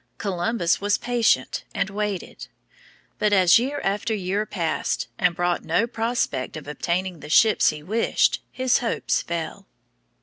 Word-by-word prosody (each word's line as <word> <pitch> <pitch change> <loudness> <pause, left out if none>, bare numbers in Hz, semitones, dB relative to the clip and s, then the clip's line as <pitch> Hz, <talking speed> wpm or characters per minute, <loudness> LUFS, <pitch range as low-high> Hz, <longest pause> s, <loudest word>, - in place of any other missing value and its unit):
Columbus 185 -1 0
was 205 0 +2
patient 235 - +1
and 195 0 -1
waited. 205 -2 -4 0.7
But 210 -1 +2
as 185 +1 +6
year 275 +4 -2
after 205 +3 -1
year 200 +2 -2
passed 165 -5 -2
and 180 -2 +2
brought 175 0 0
no 230 - +1
prospect 230 - -2
of 150 - -10
obtaining 175 +4 -2
the 150 - -10
ships 215 +7 +5
he 150 -1 -5
wished, 220 +7 +1
his 255 -1 +2
hopes 235 -2 -1
fell. 170 +3 -5
195 Hz, 140 wpm, -24 LUFS, 170-225 Hz, 0.7 s, as